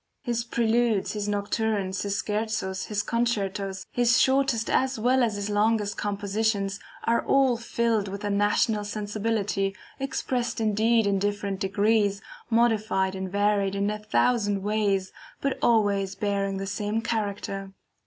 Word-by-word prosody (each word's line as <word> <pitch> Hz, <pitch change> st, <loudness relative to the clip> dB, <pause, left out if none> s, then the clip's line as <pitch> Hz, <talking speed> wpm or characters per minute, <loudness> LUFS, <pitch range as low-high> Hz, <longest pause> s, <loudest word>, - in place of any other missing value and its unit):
His 235 Hz, -1 st, -1 dB
PRELUDES, 230 Hz, -2 st, +1 dB
his 210 Hz, -1 st, -3 dB
NOCTURNES, 205 Hz, -1 st, -1 dB
his 200 Hz, -1 st, -1 dB
SCHERZOS, 210 Hz, -3 st, -2 dB
his 205 Hz, -1 st, -2 dB
CONCERTOS, 200 Hz, -5 st, -1 dB
his 240 Hz, -1 st, +3 dB
shortest 265 Hz, -4 st, +2 dB
as 265 Hz, -1 st, +1 dB
well 250 Hz, +4 st, +3 dB
as 225 Hz, -4 st, +1 dB
his 205 Hz, 0 st, -3 dB
longest 210 Hz, -1 st, +1 dB
compositions, 200 Hz, 0 st, -1 dB, 0.2 s
are 235 Hz, -, +2 dB
all 270 Hz, -2 st, +3 dB
filled 230 Hz, -2 st, 0 dB
with 200 Hz, +1 st, -6 dB
the 205 Hz, -, -2 dB
national 205 Hz, +1 st, +2 dB
sensibility, 205 Hz, -1 st, -2 dB, 0.2 s
expressed 250 Hz, -3 st, -2 dB
indeed 220 Hz, +1 st, +2 dB
in 200 Hz, -1 st, +1 dB
different 205 Hz, -1 st, -2 dB
degrees, 200 Hz, +1 st, +2 dB, 0.3 s
modified 220 Hz, -5 st, +2 dB
and 190 Hz, -1 st, -5 dB
varied 200 Hz, -1 st, +1 dB
in 200 Hz, +1 st, 0 dB
a 210 Hz, -, -4 dB
thousand 210 Hz, -2 st, +1 dB
ways, 200 Hz, -2 st, 0 dB, 0.3 s
but 275 Hz, -1 st, -1 dB
always 200 Hz, -4 st, +2 dB
bearing 200 Hz, -1 st, -1 dB
the 195 Hz, -, -3 dB
same 210 Hz, +3 st, -2 dB
character. 200 Hz, -3 st, -3 dB
210 Hz, 135 wpm, -26 LUFS, 200-225 Hz, 0.3 s, his